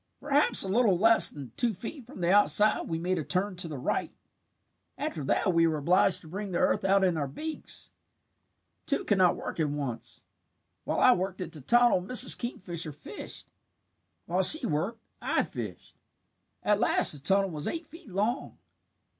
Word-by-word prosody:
"Perhaps 290 0 +2
a - - -5
little 205 -2 +2
less 225 +4 +6
than 140 -5 -10
two 235 -4 -1
feet 240 - -9
from 245 -8 -11
the 170 +1 +1
outside 205 +1 +4
we 165 - -3
made 180 +2 -2
a - - -3
turn 185 +5 -2
to 175 -1 -6
the 150 -3 -7
right. 125 - -3 0.9
After 150 - -4
that 185 +6 0
we 165 0 +3
were 160 -1 -1
obliged 180 +4 +2
to 160 - -14
bring 200 +5 -6
the 175 - -3
earth - - +1
out 195 0 +2
in 180 -3 +1
our 145 -2 -2
beaks. 310 - -7 1.0
"Two 280 - -1
could 205 -2 +1
not 180 -1 +4
work - - -7
at 155 -2 0
once. 140 -5 -6 0.6
While - - -2
I - - +6
worked 185 +1 -4
at 180 - -6
the 155 - -7
tunnel 240 - +3
Mrs. 250 +6 +4
Kingfisher 175 -9 -5
fished. 145 - -9 0.8
While 180 +3 0
she 260 - +7
worked, 185 +9 -3 0.2
I - - 0
fished. - - -8 0.7
At 210 -1 +1
last 240 - +5
the 145 - -3
tunnel 195 +6 +1
was 150 -2 -5
eight 335 0 -4
feet 330 -2 -15
long. 210 +7 -3
185 Hz, 180 wpm, -28 LUFS, 165-225 Hz, 1.0 s, she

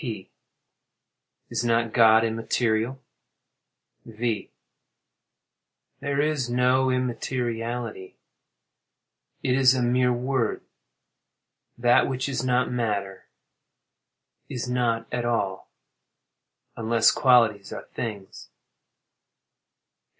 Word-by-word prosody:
P. 110 - -6 1.2
Is - - -1
not 115 -1 +1
God 110 -1 +6
immaterial? 115 +2 -1 1.0
V. 115 0 -3 1.5
There 140 0 -2
is 145 -4 0
no 125 +2 +2
immateriality—it 120 -4 -3 1.4
is 130 -1 +5
a 125 - 0
mere 125 +1 +2
word. 125 -1 -1 1.1
That 120 0 +4
which 130 0 -2
is 130 -3 -2
not 125 0 +1
matter, 105 -5 -3 1.2
is 125 0 -4
not 120 -2 0
at 125 -1 -1
all—unless 115 +1 -3
qualities 115 -7 +3
are - - -7
things. 105 -5 -7
120 Hz, 75 wpm, -25 LUFS, 115-125 Hz, 1.5 s, God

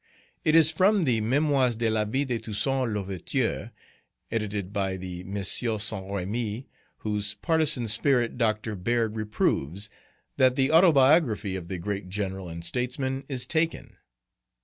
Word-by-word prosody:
It 155 - +3
is 160 -1 +8
from 190 +4 +3
the 120 -7 +1
"Mémoires 130 0 +2
de 115 0 0
la 110 -1 +1
Vie 130 +7 -1
de 125 -4 -2
Toussaint 115 +4 0
L'Ouverture," 100 -4 -2 0.6
edited 105 -3 -3
by 95 -2 -1
the 90 -1 -7
M. 100 +2 -5
Saint 110 -2 0
Remy, 105 +5 -3 0.4
whose 105 -1 -1
partisan 155 -7 +1
spirit 120 +2 +1
Dr. 110 -2 0
Beard 115 +3 -1
reproves, 105 -3 -2 0.5
that 130 -1 +4
the 135 +1 +1
Autobiography 145 - +4
of 90 -3 -6
the 95 - -4
great 95 +1 -5
General 95 -2 -4
and 85 0 -7
Statesman 130 +5 -2
is 130 -3 -3
taken. 165 0 -2
110 Hz, 140 wpm, -26 LUFS, 100-130 Hz, 0.6 s, is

